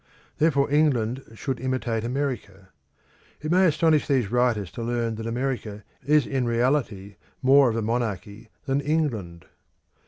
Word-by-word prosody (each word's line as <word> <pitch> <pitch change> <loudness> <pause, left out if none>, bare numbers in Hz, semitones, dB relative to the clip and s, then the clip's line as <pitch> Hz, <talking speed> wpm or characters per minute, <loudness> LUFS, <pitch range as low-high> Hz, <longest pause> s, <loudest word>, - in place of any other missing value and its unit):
Therefore 140 -3 +3
England 135 -5 +2
should 130 +2 -4
imitate 125 -3 -2
America. 120 -7 -4 0.7
It 155 +1 -4
may 185 +1 +5
astonish 155 -1 +2
these 125 -7 +1
writers 120 -7 +1
to 115 - -7
learn 115 -1 -1
that 110 0 -5
America 115 -4 -3 0.2
is 150 -2 +3
in 130 -2 -1
reality 115 -5 -1 0.3
more 135 0 +6
of 115 - -2
a 115 - -1
monarchy 105 -2 -3 0.2
than 135 +1 0
England. 120 - -2
125 Hz, 135 wpm, -25 LUFS, 110-140 Hz, 0.7 s, more